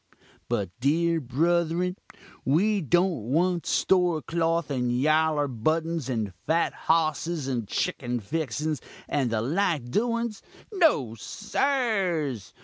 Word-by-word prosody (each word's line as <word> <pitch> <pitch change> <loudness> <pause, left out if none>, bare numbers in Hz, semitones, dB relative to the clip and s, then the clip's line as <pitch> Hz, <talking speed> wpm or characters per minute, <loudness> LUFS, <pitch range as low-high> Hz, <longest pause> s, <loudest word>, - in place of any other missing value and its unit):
"But, 95 -4 -1
dear 165 +5 +2
bruthrun, 170 +6 +1 0.5
we 195 +9 +2
don't 175 - +1
want 175 +3 +1
store 180 -4 +2
cloth 165 -1 0
and 125 -3 0
yaller 155 +3 +2
buttins, 155 +4 -1
and 110 -6 -2
fat 165 +2 +2
hossis 160 -1 +1
and 120 -5 -2
chickin 120 +3 -2
fixins, 150 +4 -2 0.3
and 135 -4 0
the 110 -1 0
like 155 -3 0
doins 230 - -1 0.3
no, 315 - +3
sirs! 190 - -1
160 Hz, 110 wpm, -26 LUFS, 130-175 Hz, 0.5 s, no